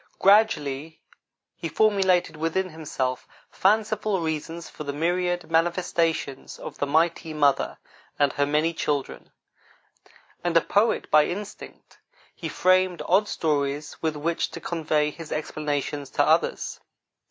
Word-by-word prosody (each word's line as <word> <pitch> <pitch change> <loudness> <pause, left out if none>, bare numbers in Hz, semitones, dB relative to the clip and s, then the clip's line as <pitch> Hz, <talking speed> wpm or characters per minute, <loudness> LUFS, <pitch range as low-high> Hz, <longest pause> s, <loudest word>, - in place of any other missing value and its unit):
Gradually, 160 -8 +3 0.6
he 165 - -5
formulated 190 -5 +2
within 165 +4 -1
himself 135 -5 -3 0.2
fanciful 215 0 +1
reasons 165 +1 -4
for - - -8
the 140 -1 -4
myriad 175 +2 -1
manifestations 165 -4 0
of - - -9
the 145 - 0
Mighty 160 +1 +1
Mother 145 -2 +2 0.4
and 145 -2 +2
her 145 0 +1
many 155 +3 +1
children; 145 -4 -3 1.1
and 175 -1 +2
a - - +6
poet 210 +7 +1
by 150 0 +6
instinct, 200 +3 -8 0.3
he - - -6
framed 185 -1 +2
odd 195 +4 +3
stories 145 -3 -1
with 160 -1 -1
which 165 +3 -1
to - - -8
convey 155 -3 0
his 165 0 -10
explanations 145 -2 -3
to - - +2
others. - - +1
165 Hz, 125 wpm, -25 LUFS, 150-180 Hz, 1.1 s, a